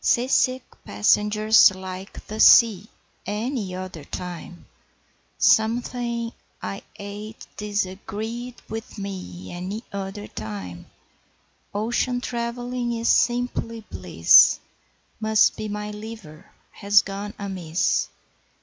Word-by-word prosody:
Seasick 255 Hz, +1 st, +2 dB, 0.2 s
passengers 210 Hz, -, +5 dB
like 190 Hz, +1 st, -8 dB
the 215 Hz, +1 st, -7 dB
sea 220 Hz, -4 st, +7 dB, 0.4 s
Any 210 Hz, -2 st, -3 dB
other 185 Hz, -4 st, -7 dB
time. 175 Hz, +2 st, -7 dB, 0.7 s
'Something.. 235 Hz, +1 st, +1 dB, 0.3 s
I 100 Hz, 0 st, -5 dB
ate.. 205 Hz, +2 st, -8 dB
disagreed.. 210 Hz, +4 st, -4 dB
with 225 Hz, +1 st, -7 dB
me! 185 Hz, -, -7 dB
Any 190 Hz, +6 st, -5 dB
other 200 Hz, +1 st, -5 dB
time 100 Hz, -, -7 dB, 0.8 s
Ocean 240 Hz, +4 st, 0 dB
trav'lling 240 Hz, 0 st, -3 dB
is.. 230 Hz, -, 0 dB
simply 240 Hz, -2 st, +1 dB
bliss, 85 Hz, -2 st, +6 dB, 0.6 s
Must 220 Hz, 0 st, +4 dB
be 215 Hz, -, -5 dB
my.. 210 Hz, 0 st, -4 dB
liver.. 210 Hz, -7 st, -10 dB, 0.2 s
has 205 Hz, 0 st, +4 dB
gone 200 Hz, +1 st, -6 dB
amiss 185 Hz, -4 st, -1 dB
210 Hz, 95 wpm, -24 LUFS, 185-230 Hz, 0.8 s, sea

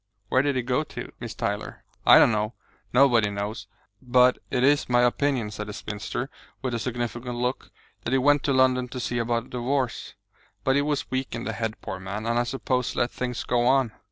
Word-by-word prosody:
"Where 130 Hz, -, +4 dB
did 140 Hz, 0 st, 0 dB
he 130 Hz, -, 0 dB
go 125 Hz, +5 st, +1 dB
to, -, -, -8 dB
Miss 120 Hz, -3 st, -6 dB
Tyler?" 105 Hz, +1 st, -3 dB, 0.2 s
"I -, -, +10 dB
don't -, -, +6 dB
know; 105 Hz, +1 st, -1 dB, 0.4 s
nobody 120 Hz, -5 st, +5 dB
knows. 100 Hz, +1 st, -4 dB, 0.3 s
But 125 Hz, 0 st, +4 dB
it 125 Hz, -1 st, 0 dB
is 145 Hz, 0 st, +3 dB
my 120 Hz, 0 st, +4 dB
opinion," 125 Hz, -3 st, +1 dB
said 105 Hz, 0 st, -6 dB
the 105 Hz, -, -6 dB
spinster, 105 Hz, +6 st, -5 dB, 0.3 s
with 130 Hz, -2 st, -1 dB
a 120 Hz, -, -1 dB
significant 120 Hz, 0 st, -3 dB
look, 125 Hz, +2 st, -2 dB, 0.3 s
"that -, -, -3 dB
he 135 Hz, -, +4 dB
went 145 Hz, +2 st, +4 dB
to 140 Hz, -, +2 dB
London 130 Hz, -1 st, +3 dB
to 130 Hz, +1 st, -6 dB
see 120 Hz, 0 st, -2 dB
about 115 Hz, 0 st, 0 dB
a -, -, -18 dB
divorce. 125 Hz, +1 st, -2 dB, 0.5 s
But 135 Hz, -, +2 dB
he 140 Hz, -, +4 dB
was 145 Hz, -1 st, -2 dB
weak 130 Hz, -2 st, -2 dB
in 115 Hz, -, -4 dB
the 110 Hz, -, -3 dB
head, 110 Hz, -1 st, -3 dB
poor 95 Hz, -2 st, -5 dB
man, 100 Hz, +3 st, -5 dB
and 120 Hz, +1 st, +1 dB
I -, -, +3 dB
suppose 125 Hz, -1 st, -1 dB
let 120 Hz, -, +1 dB
things 125 Hz, -2 st, -3 dB
go 120 Hz, 0 st, +1 dB
on. 130 Hz, -3 st, +3 dB
125 Hz, 215 wpm, -26 LUFS, 115-130 Hz, 0.5 s, I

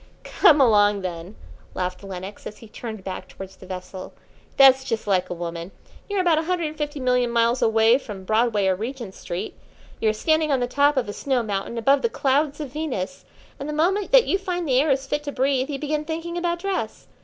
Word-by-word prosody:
"Come 310 Hz, -7 st, +4 dB
along, 205 Hz, -5 st, +4 dB
then," 180 Hz, +2 st, -6 dB, 0.4 s
laughed 180 Hz, +1 st, -3 dB
Lenox, 190 Hz, +1 st, -7 dB
as 210 Hz, -, -9 dB
he 225 Hz, -, -13 dB
turned 220 Hz, -2 st, -8 dB
back 185 Hz, -1 st, -6 dB
towards 190 Hz, 0 st, -10 dB
the 185 Hz, -, -13 dB
vessel. 185 Hz, 0 st, -8 dB, 0.4 s
"That's 265 Hz, -1 st, +7 dB
just 225 Hz, -4 st, -3 dB
like 190 Hz, -3 st, +1 dB
a 175 Hz, -, -4 dB
woman. 170 Hz, 0 st, -5 dB, 0.4 s
You're 405 Hz, -2 st, +1 dB
about 340 Hz, -3 st, +3 dB
a 320 Hz, -, -3 dB
hundred 355 Hz, -1 st, -1 dB
and 305 Hz, -, -10 dB
fifty 295 Hz, -1 st, -4 dB
million 250 Hz, -1 st, +1 dB
miles 235 Hz, +1 st, +2 dB
away 225 Hz, +2 st, +4 dB
from 205 Hz, -7 st, -9 dB
Broadway 215 Hz, 0 st, +1 dB
or 190 Hz, -1 st, +2 dB
Regent 230 Hz, 0 st, -6 dB
Street. 175 Hz, -1 st, -6 dB, 0.4 s
You 220 Hz, -, +2 dB
are -, -, +1 dB
standing 315 Hz, +6 st, +1 dB
on 270 Hz, -, +2 dB
the 245 Hz, -, +1 dB
top 285 Hz, +3 st, +2 dB
of 250 Hz, -, +1 dB
a 205 Hz, -, -5 dB
snow 260 Hz, -1 st, -1 dB
mountain 205 Hz, +2 st, -3 dB
above 275 Hz, +5 st, +3 dB
the 465 Hz, -, +1 dB
clouds 290 Hz, -2 st, 0 dB
of 285 Hz, -4 st, -6 dB
Venus, 275 Hz, -8 st, -4 dB, 0.3 s
and 280 Hz, -, -5 dB
the -, -, -3 dB
moment 370 Hz, +6 st, +1 dB
that -, -, +7 dB
you 390 Hz, -, +1 dB
find 355 Hz, -3 st, -3 dB
the 260 Hz, -1 st, +4 dB
air 305 Hz, -, 0 dB
is 270 Hz, 0 st, +1 dB
fit 295 Hz, +2 st, -2 dB
to 285 Hz, -, -3 dB
breathe 270 Hz, 0 st, 0 dB
you 285 Hz, -, -3 dB
begin 300 Hz, +1 st, -2 dB
thinking 330 Hz, +2 st, -5 dB
about 345 Hz, 0 st, -1 dB
dress. 390 Hz, +2 st, -4 dB
255 Hz, 220 wpm, -23 LUFS, 205-300 Hz, 0.4 s, That's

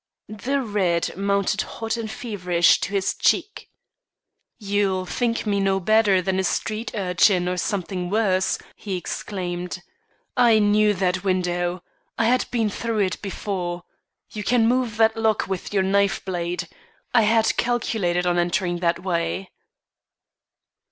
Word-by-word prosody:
The 260 Hz, +6 st, -2 dB
red 190 Hz, -6 st, 0 dB
mounted 200 Hz, +1 st, 0 dB
hot 225 Hz, 0 st, -4 dB
and 230 Hz, -2 st, -4 dB
feverish 180 Hz, -7 st, +2 dB
to -, -, -3 dB
his 195 Hz, -2 st, 0 dB
cheek. 415 Hz, -, 0 dB, 0.9 s
"You'll 200 Hz, -3 st, 0 dB
think 230 Hz, +4 st, -1 dB
me 200 Hz, -2 st, +1 dB
no 195 Hz, -1 st, +1 dB
better 200 Hz, -1 st, +3 dB
than 190 Hz, 0 st, 0 dB
a -, -, +1 dB
street 215 Hz, +4 st, -2 dB
urchin 180 Hz, -1 st, +2 dB
or 180 Hz, -, 0 dB
something 180 Hz, -1 st, -2 dB
worse," 190 Hz, -3 st, +1 dB, 0.2 s
he 195 Hz, -3 st, -4 dB
exclaimed. 180 Hz, -1 st, -4 dB, 0.6 s
"I 240 Hz, -3 st, +5 dB
knew 210 Hz, 0 st, +3 dB
that 185 Hz, 0 st, 0 dB
window; 175 Hz, -1 st, -1 dB, 0.3 s
I 225 Hz, -, +2 dB
had 250 Hz, +2 st, +2 dB
been 225 Hz, -4 st, 0 dB
through 225 Hz, 0 st, -2 dB
it 185 Hz, -2 st, -1 dB
before. 180 Hz, -3 st, -4 dB, 0.5 s
You 210 Hz, -, -5 dB
can 230 Hz, +1 st, +3 dB
move 245 Hz, -3 st, 0 dB
that 220 Hz, 0 st, +4 dB
lock 220 Hz, -1 st, +1 dB
with 190 Hz, -2 st, -4 dB
your 195 Hz, -2 st, +2 dB
knife 200 Hz, +1 st, +1 dB
blade. 175 Hz, -1 st, -3 dB, 0.5 s
I 240 Hz, -, +6 dB
had 220 Hz, +1 st, +3 dB
calculated 215 Hz, -7 st, 0 dB
on 175 Hz, 0 st, +2 dB
entering 175 Hz, 0 st, 0 dB
that 170 Hz, 0 st, 0 dB
way." 180 Hz, +1 st, -2 dB
195 Hz, 140 wpm, -23 LUFS, 180-220 Hz, 0.9 s, I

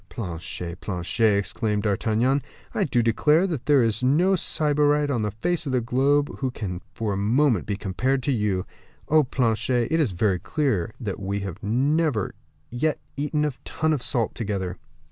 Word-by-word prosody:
"Planchet! 85 Hz, -3 st, -5 dB
Planchet!" 100 Hz, +3 st, +1 dB
exclaimed 105 Hz, +1 st, -1 dB
D'Artagnan, 110 Hz, +6 st, +1 dB, 0.3 s
"I -, -, +1 dB
do 120 Hz, -4 st, +1 dB
declare 150 Hz, +9 st, +3 dB
that 160 Hz, -10 st, -4 dB
there 145 Hz, -4 st, +5 dB
is 115 Hz, -1 st, 0 dB
no 165 Hz, +9 st, +3 dB
sybarite 150 Hz, -3 st, +2 dB
upon 120 Hz, -5 st, 0 dB
the 105 Hz, -, 0 dB
face 155 Hz, -, -2 dB
of 135 Hz, -, -2 dB
the 125 Hz, -, +3 dB
globe 135 Hz, +5 st, +1 dB
who 130 Hz, -, 0 dB
can 95 Hz, -7 st, -5 dB
for 110 Hz, -3 st, -2 dB
a -, -, -2 dB
moment 115 Hz, +2 st, +2 dB
be 100 Hz, -2 st, -1 dB
compared 130 Hz, +7 st, -1 dB
to 140 Hz, -, +1 dB
you. 105 Hz, -6 st, 0 dB, 0.4 s
Oh, 155 Hz, 0 st, +5 dB
Planchet, 120 Hz, -1 st, 0 dB
it 165 Hz, -, +2 dB
is 135 Hz, -, +1 dB
very 95 Hz, 0 st, +1 dB
clear 115 Hz, -, -1 dB
that 105 Hz, -6 st, -4 dB
we 100 Hz, +1 st, -2 dB
have 95 Hz, 0 st, -6 dB
never 135 Hz, -, +1 dB, 0.4 s
yet 145 Hz, +5 st, 0 dB, 0.2 s
eaten 150 Hz, +2 st, 0 dB
a 150 Hz, -, -1 dB
ton 160 Hz, 0 st, 0 dB
of 145 Hz, -, -1 dB
salt 120 Hz, -4 st, 0 dB
together." 95 Hz, -5 st, -3 dB
120 Hz, 175 wpm, -24 LUFS, 100-145 Hz, 0.4 s, there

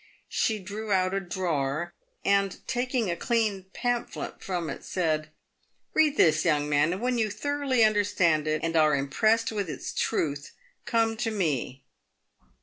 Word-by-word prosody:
She 220 Hz, -, +1 dB
drew 210 Hz, +2 st, -6 dB
out 185 Hz, -1 st, +2 dB
a 195 Hz, -, +1 dB
drawer, 170 Hz, -3 st, -2 dB, 0.3 s
and 195 Hz, -1 st, +2 dB
taking 245 Hz, -5 st, 0 dB
a -, -, -1 dB
clean 210 Hz, -2 st, 0 dB
pamphlet 245 Hz, +1 st, -3 dB
from 175 Hz, -3 st, -2 dB
it -, -, -6 dB
said, 155 Hz, -4 st, -1 dB, 0.3 s
" -, -, -43 dB
Bead 305 Hz, -2 st, +4 dB
this, 155 Hz, -2 st, +4 dB
young 150 Hz, -3 st, +2 dB
man, 145 Hz, +2 st, +3 dB
and 185 Hz, +3 st, -3 dB
when 250 Hz, -1 st, +1 dB
you 220 Hz, -1 st, +1 dB
thoroughly 280 Hz, 0 st, 0 dB
understand 190 Hz, -7 st, +2 dB
it, 155 Hz, 0 st, 0 dB
and 165 Hz, 0 st, -1 dB
are 155 Hz, -2 st, +5 dB
impressed 215 Hz, +12 st, +1 dB
with 200 Hz, -5 st, -2 dB
its -, -, -5 dB
truth, 145 Hz, -2 st, -1 dB, 0.3 s
come 225 Hz, -1 st, +1 dB
to 235 Hz, 0 st, -1 dB
me. 150 Hz, -, -2 dB
190 Hz, 155 wpm, -27 LUFS, 155-225 Hz, 0.3 s, are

